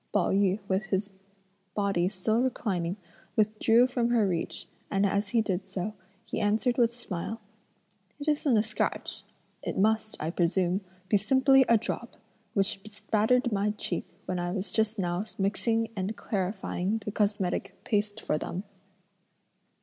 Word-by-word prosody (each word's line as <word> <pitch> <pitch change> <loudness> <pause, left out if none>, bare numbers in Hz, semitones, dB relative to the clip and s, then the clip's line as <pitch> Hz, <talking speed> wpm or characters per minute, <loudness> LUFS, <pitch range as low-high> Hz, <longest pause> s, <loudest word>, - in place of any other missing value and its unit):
Pao - - +2
yü 195 0 +3
with 195 +1 +1
his 195 +2 -1 0.6
body 195 -3 +2
still 215 +4 +1
reclining 190 -8 -1 0.4
withdrew 220 +2 +4
from 245 -2 0
her 230 -4 +3
reach, 170 -3 -2 0.2
and 195 0 +2
as 200 +1 +1
he 230 0 +3
did 190 -2 -1
so, 195 +2 -4 0.3
he 220 - -3
answered 225 +4 +2
with 235 -1 +5
a 235 - -15
smile: 225 -1 -4 0.8
"It 290 - -6
isn't 290 -5 +3
a 210 - +4
scratch; 215 -1 -2 0.4
it - - -3
must, 215 +2 +2
I 155 +2 -2
presume, 180 +2 +1 0.3
be 205 - +4
simply 265 +5 +5
a 230 - +7
drop, 230 +2 -4 0.4
which 195 0 +1
bespattered 215 +4 +1
my 205 +1 +1
cheek - - -2 0.2
when 180 -1 -2
I 175 0 -1
was 190 0 -3
just 220 +1 +1
now 175 0 0
mixing 225 +3 +1
and 200 +2 -2
clarifying 195 0 -1
the 210 - -2
cosmetic 205 -3 0
paste 205 0 0
for 150 - 0
them." 185 - -4
205 Hz, 150 wpm, -29 LUFS, 190-225 Hz, 0.8 s, a